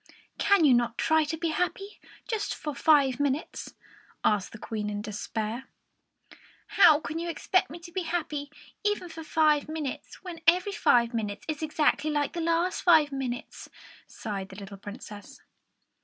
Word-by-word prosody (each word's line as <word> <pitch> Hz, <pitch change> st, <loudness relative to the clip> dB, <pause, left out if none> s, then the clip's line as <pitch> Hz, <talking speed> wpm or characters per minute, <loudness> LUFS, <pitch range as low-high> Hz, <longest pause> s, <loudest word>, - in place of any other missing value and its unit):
"Can 400 Hz, -5 st, +4 dB
you 270 Hz, -, +6 dB
not 240 Hz, -1 st, +1 dB
try 315 Hz, -1 st, +3 dB
to 310 Hz, +2 st, -3 dB
be 335 Hz, 0 st, -1 dB
happy, 390 Hz, +5 st, -2 dB, 0.3 s
just 430 Hz, -3 st, -2 dB
for 300 Hz, -1 st, -5 dB
five 275 Hz, -4 st, +4 dB
minutes?" 285 Hz, +2 st, -2 dB, 0.5 s
asked 205 Hz, -2 st, +1 dB
the -, -, -9 dB
Queen, 210 Hz, -1 st, -4 dB
in 205 Hz, 0 st, -4 dB
despair. 220 Hz, +3 st, -4 dB, 1.0 s
"How 325 Hz, -7 st, +7 dB
can 315 Hz, +1 st, -5 dB
you 340 Hz, 0 st, -3 dB
expect 370 Hz, +3 st, +1 dB
me 335 Hz, -, -8 dB
to 340 Hz, 0 st, -11 dB
be 375 Hz, +2 st, -2 dB
happy, 310 Hz, -4 st, -3 dB, 0.3 s
even 415 Hz, -4 st, 0 dB
for 325 Hz, 0 st, -8 dB
five 310 Hz, -2 st, +2 dB
minutes, 310 Hz, -4 st, -5 dB
when 345 Hz, -3 st, -8 dB
every 360 Hz, +4 st, +4 dB
five 240 Hz, -, +3 dB
minutes 210 Hz, -3 st, -3 dB
is 310 Hz, -1 st, -3 dB
exactly 310 Hz, 0 st, +1 dB
like 295 Hz, -1 st, 0 dB
the 340 Hz, -, -3 dB
last 335 Hz, +2 st, +1 dB
five 315 Hz, -5 st, +5 dB
minutes?" 260 Hz, -3 st, -5 dB, 0.4 s
sighed 200 Hz, -3 st, -5 dB
the 190 Hz, -, -11 dB
little 200 Hz, 0 st, -9 dB
Princess. 205 Hz, +1 st, -10 dB
300 Hz, 160 wpm, -28 LUFS, 235-335 Hz, 1.0 s, How